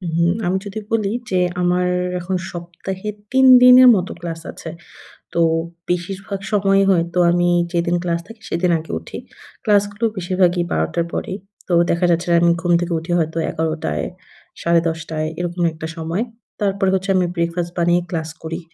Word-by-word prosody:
হুম, 170 +1 +3
আমি 185 +2 +1
যদি 200 +2 -5
বলি 210 -3 +1 0.2
যে, 185 -1 +1 0.2
আমার 180 0 +2 0.3
এখন 185 +2 -3 0.2
সপ্তাহে 175 +3 -7 0.2
৩ 265 0 +4 0.2
দিনের 250 0 +9
মতো 185 -1 -2
ক্লাস 165 -1 -5
আছে। 165 - -9 0.6
তো 170 - 0 0.5
বেশিরভাগ 190 +3 -3
সময়ই 195 -1 +3
হয়তো 170 0 +1
আমি 175 0 +2 0.2
যেদিন 170 0 0
ক্লাস 170 -1 0
থাকে 225 0 -13
সেদিন 175 +1 +1
আগে 160 - -9
উঠি। 80 - -9 0.5
ক্লাসগুলো 205 +1 +1
বেশিরভাগই 180 -1 +1
১২ 80 0 +1
টার 170 -1 0
পরেই। 195 -2 -3 0.3
তো 180 - -1 0.2
দেখা 170 +1 +2
যাচ্ছে 170 +2 0
যে, - - +5
আমি 170 0 +5
ঘুম 175 0 0
থেকে 175 -1 -2
উঠি 170 +2 -7
হয়তো 160 +1 -2
১১ 160 0 -1 0.2
টায়, 75 -1 -1 0.6
সাড়ে 170 0 +3
১০ 160 0 -2
টায় 155 0 -2
এরকম 175 0 -3
একটা 160 0 -6
সময়। 165 +7 -2 0.4
তারপরে 195 -1 +1
হচ্ছে 195 +1 -3
আমি 180 -1 +3
ব্রেকফাস্ট 170 0 -2
বানিয়ে 175 +1 +2
ক্লাস 160 -3 -3
করি। 165 +2 -4
175 Hz, 170 wpm, -20 LUFS, 170-190 Hz, 0.6 s, দিনের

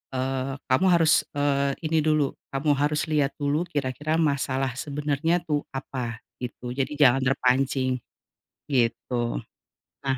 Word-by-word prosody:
eee, 130 +1 -1
kamu 130 +8 +3
harus, 165 -2 +4
eee 140 -1 +1
ini 160 0 +2
dulu, 155 -2 +2 0.2
kamu 145 +2 +2
harus 150 +2 +1
liat 145 -2 +1
dulu 150 +4 0
kira-kira 145 +2 -1
masalah 135 -4 +1
sebenernya 150 +4 0
tuh 150 -3 -1
apa, 125 -4 -5 0.2
gitu. 125 0 -6
Jadi 135 +3 -2
jangan 135 -2 +6
terpancing. 130 0 +1 0.7
Gitu. 120 - 0 0.7
Nah 135 0 +1
140 Hz, 125 wpm, -26 LUFS, 130-150 Hz, 0.7 s, jangan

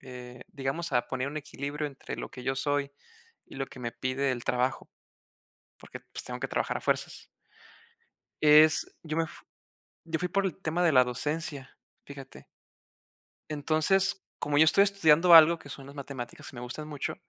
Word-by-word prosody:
eh, 125 -1 -10
digamos, 140 +4 -4
a 120 -1 +3
poner 130 +1 -2
un 145 - -7
equilibrio 150 0 -4
entre 140 -2 -8
lo - - -6
que 125 - -10
yo 130 +2 -1
soy 145 +1 -1 0.5
y - - -13
lo 135 0 -3
que 130 - -13
me 120 -1 -4
pide 130 +1 -1
el 120 -1 -6
trabajo, 125 +1 -1 0.9
porque, - - -11
pues, - - -8
tengo - - -6
que - - -3
trabajar - - -1
a - - -8
fuerzas. - - -2 1.2
Es 155 +1 +6 0.2
yo 155 -1 -4
me 165 - +2 0.8
yo 165 -1 -2
fui 180 - -2
por 195 +3 0
el 185 - -4
tema 175 -2 -2
de 165 - +4
la 130 -2 +6
docencia, 140 +2 -4 0.3
fíjate. 135 -1 -12 1.0
Entonces, 160 +6 +1 0.2
como 145 0 -1
yo 155 - +7
estoy 195 +5 +5
estudiando 175 -4 +4
algo 165 +1 +9
que 145 - -13
son 135 -1 -9
las 140 +1 -12
matemáticas 135 -4 -7
y - - -14
me 120 - -7
gustan 125 +5 -6
mucho 145 -3 -4
145 Hz, 175 wpm, -28 LUFS, 130-160 Hz, 1.2 s, algo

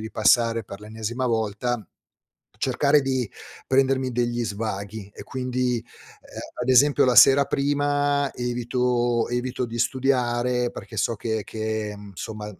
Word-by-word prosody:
ripassare 115 0 +2
per 100 0 -10
l'ennesima 110 +4 -4
volta, 110 0 -1 0.7
cercare 140 +3 +2
di 130 -4 -1 0.4
prendermi 130 -1 +2
degli 120 0 -1
svaghi 100 -1 -5
e - - -9
quindi, 125 -1 -1
ehm, 115 - -6 0.8
ad 125 - -4
esempio 140 +3 +5
la 125 - +3
sera 140 +1 +8
prima 145 0 0
evito 120 -1 0
evito 125 +1 -2
di 120 0 -6
studiare 125 -1 +1
perché 110 - -10
so 110 +2 0
che 110 0 -2
che, 110 -1 -3
insomma, 105 +1 -8
120 Hz, 125 wpm, -24 LUFS, 110-130 Hz, 0.8 s, sera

